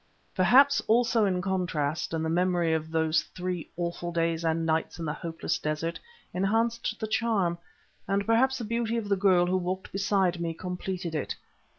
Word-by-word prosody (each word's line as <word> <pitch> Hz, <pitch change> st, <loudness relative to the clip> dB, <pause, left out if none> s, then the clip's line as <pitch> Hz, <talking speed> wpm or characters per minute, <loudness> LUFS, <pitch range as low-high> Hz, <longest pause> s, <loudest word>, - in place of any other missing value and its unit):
Perhaps 255 Hz, +10 st, +5 dB
also 230 Hz, -2 st, +3 dB
the 180 Hz, -1 st, -1 dB
contrast, 170 Hz, -5 st, -1 dB
and 160 Hz, -1 st, -1 dB
the -, -, 0 dB
memory 175 Hz, -1 st, +2 dB
of 160 Hz, 0 st, -2 dB
those 160 Hz, -1 st, +2 dB
three 180 Hz, -2 st, -4 dB
awful 175 Hz, 0 st, -3 dB
days 165 Hz, 0 st, 0 dB
and 165 Hz, 0 st, 0 dB
nights 160 Hz, 0 st, 0 dB
in 165 Hz, -, -4 dB
the 150 Hz, -, -1 dB
hopeless 165 Hz, +1 st, -3 dB
desert, 155 Hz, +2 st, -2 dB, 0.3 s
enhanced 225 Hz, +4 st, 0 dB
the -, -, -2 dB
charm, 215 Hz, -6 st, +1 dB, 0.5 s
and 200 Hz, +1 st, 0 dB
perhaps 260 Hz, +4 st, +3 dB
the 240 Hz, -, -5 dB
beauty 230 Hz, +1 st, -1 dB
of 215 Hz, -3 st, -3 dB
the 200 Hz, -, +4 dB
girl 185 Hz, -2 st, +4 dB
who 185 Hz, +1 st, +1 dB
walked 185 Hz, +1 st, -3 dB
beside 190 Hz, -3 st, +1 dB
me 165 Hz, -1 st, -2 dB
completed 180 Hz, -1 st, -4 dB
it. 150 Hz, -, -2 dB
180 Hz, 175 wpm, -28 LUFS, 165-205 Hz, 0.5 s, Perhaps